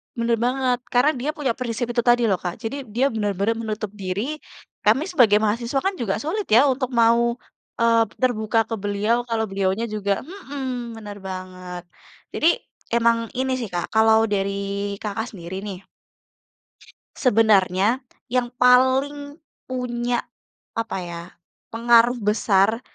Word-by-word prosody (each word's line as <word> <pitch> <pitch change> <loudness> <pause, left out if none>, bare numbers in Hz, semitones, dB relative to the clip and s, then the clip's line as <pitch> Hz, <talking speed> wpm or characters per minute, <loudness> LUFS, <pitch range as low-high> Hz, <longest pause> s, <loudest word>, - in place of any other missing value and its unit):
Benar 235 0 +1
banget. 250 0 +1
Karena 250 +5 +3
dia 265 +1 -4
punya 275 -5 0
prinsip 235 -1 -3
itu 240 - -1
tadi 240 0 +4
loh, 190 - +1
Kak. 175 -1 -4
Jadi, 255 +3 -5
dia 245 +6 +1
benar-benar 205 0 0
menutup 215 -2 -4
diri. 205 +9 -4 0.5
Kami 290 - +4
sebagai 245 - +5
mahasiswa 235 +5 0
kan 385 +1 +1
juga 205 -5 -1
sulit 395 +7 -3
ya, 235 +5 +6
untuk 255 -1 -1
mau, 235 +1 +4 0.5
eee, 230 0 +5
terbuka 225 -3 +1
ke 225 +1 -4
beliau, 210 +4 0
kalau 225 -1 0
beliaunya 195 +3 0
juga 200 -2 -1
mhm, 265 - -6
benar 205 -2 -8
banget. 185 -1 -7 0.5
Jadi, 330 +2 +3 0.4
emang 230 -1 +2
ini 260 0 0
sih, 230 - -3
Kak, 175 -2 -4
kalau 220 0 +5
dari 200 0 -2
Kakak 220 +2 -3
sendiri 180 +2 -6
nih 200 -2 -8 1.3
sebenarnya 220 -1 +3 0.2
yang 245 0 -1
paling 270 +4 +3 0.3
punya, 245 -1 -2 0.5
apa 230 -3 -2
ya, 170 -1 -7 0.5
pengaruh 235 +1 +4
besar 210 +1 +2
230 Hz, 135 wpm, -23 LUFS, 205-250 Hz, 1.3 s, ya